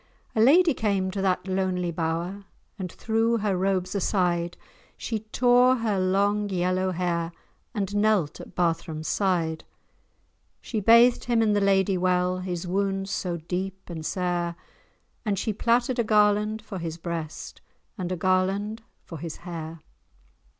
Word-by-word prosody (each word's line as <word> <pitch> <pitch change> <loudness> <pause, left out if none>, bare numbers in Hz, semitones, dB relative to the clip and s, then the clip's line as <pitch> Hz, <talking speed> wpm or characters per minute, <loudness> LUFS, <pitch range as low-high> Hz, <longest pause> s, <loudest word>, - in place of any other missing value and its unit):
A 220 - +3
lady 320 +7 +6
came 200 -5 0
to 195 0 -3
that 190 -1 0
lonely 185 -2 -1
bower, 170 +4 -3 0.3
And 180 -3 -4
threw 225 +1 +1
her 205 -3 0
robes 185 0 0
aside, 175 -3 0 0.4
She 225 -2 -3
tore 245 +3 +4
her 220 -5 0
long 200 +2 +1
yellow 185 0 0
hair, 170 -2 -1 0.4
And 200 -1 -2
knelt 205 -7 +1
at - - -13
Barthram's 165 -3 -1
side. 170 -5 0 1.0
She 220 - -3
bathed 235 +4 +5
him 235 -2 +2
in 215 -1 +2
the 205 - +2
Lady 195 -1 +2
Well, 180 0 +1
His 180 -1 -4
wounds 195 +1 -1
so 175 -2 -2
deep 185 +3 -5
and 160 -2 -6
sair, 175 0 -1 0.7
And 205 -4 -1
she 220 +3 -1
plaited 240 +3 +1
a - - +4
garland 210 0 +2
for 200 -3 -6
his 165 -1 -5
breast, 165 -2 -6 0.3
And 185 -4 -4
a 185 - -1
garland 190 +5 0 0.2
for 165 - -9
his 165 0 -6
hair. 165 -2 -6
190 Hz, 145 wpm, -26 LUFS, 175-210 Hz, 1.0 s, lady